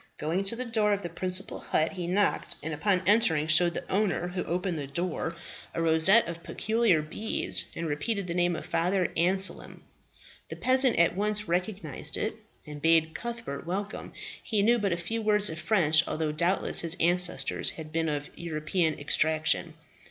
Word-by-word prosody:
Going 165 Hz, +5 st, -1 dB
to 200 Hz, -, -2 dB
the 255 Hz, +2 st, -5 dB
door 215 Hz, -3 st, +1 dB
of 200 Hz, 0 st, -3 dB
the 175 Hz, -, -4 dB
principal 185 Hz, +2 st, -4 dB
hut, 155 Hz, -, 0 dB
he 180 Hz, -3 st, -6 dB
knocked, 200 Hz, +3 st, 0 dB
and 160 Hz, +1 st, -4 dB
upon 185 Hz, +4 st, 0 dB
entering 195 Hz, -8 st, +3 dB
showed 170 Hz, +2 st, +3 dB
the -, -, -6 dB
owner 190 Hz, -3 st, -1 dB
who 180 Hz, 0 st, -4 dB
opened 180 Hz, -1 st, -2 dB
the 140 Hz, -, -5 dB
door 170 Hz, +2 st, -3 dB, 0.4 s
a 165 Hz, -, -1 dB
rosette 165 Hz, +7 st, +5 dB
of 170 Hz, 0 st, -6 dB
peculiar 220 Hz, -5 st, 0 dB
beads, 210 Hz, +8 st, -2 dB
and 170 Hz, -, -4 dB
repeated 195 Hz, +7 st, -2 dB
the 170 Hz, -, -3 dB
name 175 Hz, 0 st, +1 dB
of -, -, -7 dB
Father 180 Hz, +1 st, 0 dB
Anselm. 190 Hz, +3 st, +1 dB, 0.7 s
The -, -, -6 dB
peasant 260 Hz, -1 st, +4 dB
at 170 Hz, +1 st, +3 dB
once 210 Hz, +1 st, -1 dB
recognized 175 Hz, -4 st, -3 dB
it, 215 Hz, -, -3 dB, 0.3 s
and 150 Hz, -1 st, -9 dB
bade 160 Hz, 0 st, +3 dB
Cuthbert 235 Hz, -, -6 dB
welcome. 200 Hz, +3 st, -5 dB, 0.3 s
He 210 Hz, -2 st, -1 dB
knew 235 Hz, +3 st, +3 dB
but 200 Hz, -2 st, -1 dB
a 170 Hz, -, 0 dB
few 225 Hz, +7 st, -4 dB
words 210 Hz, -3 st, +2 dB
of 160 Hz, -, -7 dB
French, 160 Hz, -3 st, +2 dB
although 155 Hz, -1 st, -2 dB
doubtless 170 Hz, +5 st, +3 dB
his 170 Hz, +1 st, +3 dB
ancestors 180 Hz, +1 st, +4 dB
had 155 Hz, -1 st, -9 dB
been 165 Hz, 0 st, -1 dB
of 145 Hz, -1 st, -4 dB
European 160 Hz, 0 st, -2 dB
extraction. 155 Hz, +2 st, 0 dB
175 Hz, 175 wpm, -27 LUFS, 160-205 Hz, 0.7 s, rosette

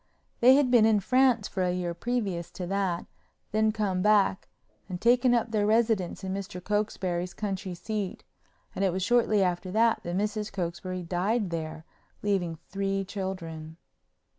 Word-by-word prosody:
They 255 Hz, +2 st, +7 dB
had 275 Hz, -3 st, +3 dB
been 230 Hz, -3 st, +6 dB
in 215 Hz, -2 st, +4 dB
France 250 Hz, 0 st, +3 dB
for 190 Hz, -, -3 dB
a 180 Hz, -1 st, +2 dB
year 180 Hz, -1 st, -2 dB
previous 195 Hz, -4 st, -2 dB
to 180 Hz, -, -5 dB
that, 190 Hz, -2 st, -1 dB, 0.5 s
then 215 Hz, 0 st, +2 dB
come 200 Hz, -4 st, -1 dB
back 205 Hz, -2 st, +3 dB, 0.4 s
and 180 Hz, -1 st, -4 dB
taken 245 Hz, +2 st, +4 dB
up 230 Hz, -1 st, 0 dB
their 210 Hz, -2 st, +1 dB
residence 220 Hz, -5 st, +1 dB
in 190 Hz, 0 st, -3 dB
Mr. 195 Hz, -2 st, -5 dB
Cokesbury's 185 Hz, -3 st, -2 dB
country 195 Hz, -3 st, -4 dB
seat, 200 Hz, +2 st, -4 dB, 0.5 s
and 195 Hz, -, -2 dB
it 190 Hz, -, +3 dB
was 185 Hz, +1 st, -2 dB
shortly 225 Hz, -3 st, +3 dB
after 180 Hz, 0 st, -1 dB
that 230 Hz, +1 st, +3 dB
Mrs. 210 Hz, +4 st, -2 dB
Cokesbury 185 Hz, 0 st, -4 dB
died 185 Hz, +4 st, 0 dB
there, 160 Hz, -1 st, -5 dB, 0.4 s
leaving 185 Hz, -5 st, 0 dB
three 195 Hz, 0 st, -1 dB
children. 165 Hz, -5 st, -6 dB
195 Hz, 155 wpm, -28 LUFS, 180-215 Hz, 0.5 s, They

